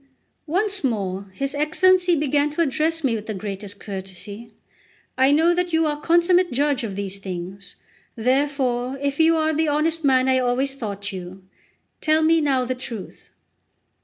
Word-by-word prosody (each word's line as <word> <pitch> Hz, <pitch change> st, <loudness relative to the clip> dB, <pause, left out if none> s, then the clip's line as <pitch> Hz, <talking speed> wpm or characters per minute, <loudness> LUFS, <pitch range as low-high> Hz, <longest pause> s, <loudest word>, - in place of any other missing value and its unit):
Once 390 Hz, +4 st, 0 dB
more 200 Hz, -6 st, -1 dB
his 275 Hz, +8 st, -3 dB
Excellency 355 Hz, +4 st, +3 dB
began 290 Hz, -1 st, +1 dB
to 300 Hz, +3 st, -2 dB
address 320 Hz, +2 st, 0 dB
me 260 Hz, -4 st, +2 dB
with 220 Hz, -1 st, -4 dB
the 215 Hz, -, -3 dB
greatest 200 Hz, 0 st, -7 dB
courtesy: 200 Hz, +3 st, -8 dB, 0.6 s
"I 265 Hz, +2 st, +4 dB
know 325 Hz, +4 st, +4 dB
that 355 Hz, -1 st, -1 dB
you 320 Hz, 0 st, +3 dB
are 295 Hz, -1 st, -2 dB
consummate 345 Hz, +2 st, +3 dB
judge 285 Hz, 0 st, +1 dB
of 205 Hz, -4 st, -4 dB
these 200 Hz, 0 st, -5 dB
things; 185 Hz, 0 st, -7 dB, 0.4 s
therefore, 255 Hz, 0 st, 0 dB
if 280 Hz, +1 st, -2 dB
you 325 Hz, 0 st, +5 dB
are 315 Hz, 0 st, +1 dB
the 315 Hz, +1 st, +1 dB
honest 315 Hz, +2 st, 0 dB
man 260 Hz, -2 st, +3 dB
I 260 Hz, 0 st, +3 dB
always 255 Hz, +2 st, 0 dB
thought 205 Hz, -6 st, -5 dB
you, 185 Hz, 0 st, -8 dB, 0.6 s
tell 310 Hz, 0 st, +3 dB
me 325 Hz, +1 st, +4 dB
now 270 Hz, -4 st, +1 dB
the 255 Hz, -, -1 dB
truth." 240 Hz, -5 st, -9 dB
270 Hz, 165 wpm, -22 LUFS, 210-315 Hz, 0.6 s, you